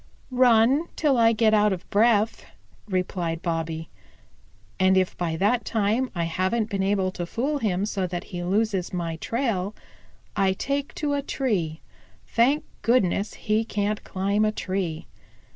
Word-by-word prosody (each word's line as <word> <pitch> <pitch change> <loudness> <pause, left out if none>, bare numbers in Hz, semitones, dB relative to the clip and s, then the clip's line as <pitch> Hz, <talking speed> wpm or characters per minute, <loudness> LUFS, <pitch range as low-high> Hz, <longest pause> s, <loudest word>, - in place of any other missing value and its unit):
"Run 250 +4 +4
till 295 -4 +2
I 230 -1 +5
get 220 -1 +3
out 210 -1 +4
of 185 -2 -4
breath," 220 0 +3 0.4
replied 180 -3 -2
Bobby. 165 -2 -3 0.9
"And 190 0 +4
if 185 -1 +1
by 165 -2 -2
that 210 +8 +2
time 225 +4 0
I 170 - 0
haven't 185 +7 -1
been 195 -1 -1
able 195 -1 +1
to 175 -2 -5
fool 280 - -1
him 195 -5 0
so 195 -3 -2
that 175 -1 -4
he 175 - -3
loses 195 0 0
my 170 -2 -3
trail, 215 -2 -2 0.6
I 190 -1 +2
take 280 +7 -3
to 295 -1 -1
a 285 - 0
tree. 195 - -2 0.4
Thank 265 +6 +2 0.2
goodness, 210 -4 +1
he 215 0 0
can't 210 -1 -2
climb 200 +3 0
a 215 - +2
tree. 185 -6 -3
205 Hz, 150 wpm, -25 LUFS, 180-230 Hz, 0.9 s, I